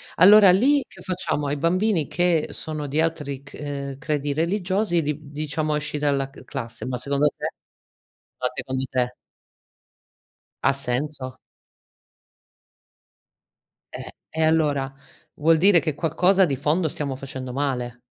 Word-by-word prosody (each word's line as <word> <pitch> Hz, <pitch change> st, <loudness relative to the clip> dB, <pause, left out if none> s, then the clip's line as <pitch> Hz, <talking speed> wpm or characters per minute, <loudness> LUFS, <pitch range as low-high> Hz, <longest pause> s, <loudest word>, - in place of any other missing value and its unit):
Allora 200 Hz, +1 st, +8 dB
lì, 275 Hz, +9 st, +4 dB
che -, -, -14 dB
facciamo? 180 Hz, -5 st, -2 dB
Ai 145 Hz, +1 st, -1 dB
bambini 180 Hz, +1 st, +1 dB
che 175 Hz, -3 st, +1 dB
sono 155 Hz, -2 st, -5 dB
di 150 Hz, +4 st, +1 dB
altri 145 Hz, -4 st, -2 dB
c 140 Hz, -, -12 dB
uhm, 140 Hz, -2 st, -5 dB
credi 145 Hz, -1 st, -2 dB
religiosi 175 Hz, +3 st, +1 dB
li 150 Hz, 0 st, -1 dB
d 145 Hz, -, -12 dB
diciamo: 150 Hz, +1 st, -2 dB
"Esci 150 Hz, 0 st, -2 dB
dalla 140 Hz, -2 st, 0 dB
cl 135 Hz, -2 st, -15 dB
classe". 115 Hz, -1 st, -6 dB
Ma 125 Hz, 0 st, -3 dB
secondo 140 Hz, +3 st, +2 dB
te? -, -, -3 dB, 0.9 s
Ma -, -, -1 dB
secondo 130 Hz, 0 st, -3 dB
te? 125 Hz, -1 st, -1 dB, 1.5 s
Ha -, -, +4 dB
senso? 130 Hz, 0 st, -2 dB, 2.6 s
Eh! -, -, -8 dB, 0.2 s
E 160 Hz, -, -3 dB
allora? 150 Hz, -4 st, +2 dB, 0.4 s
Vuol 160 Hz, +2 st, +3 dB
dire 185 Hz, +1 st, +6 dB
che 155 Hz, -3 st, -2 dB
qualcosa 180 Hz, +5 st, +3 dB
di 140 Hz, -, -1 dB
fondo 155 Hz, +5 st, +1 dB
stiamo 140 Hz, -2 st, -3 dB
facendo 130 Hz, -2 st, -7 dB
male. 125 Hz, -3 st, -3 dB
150 Hz, 135 wpm, -23 LUFS, 135-165 Hz, 2.6 s, Allora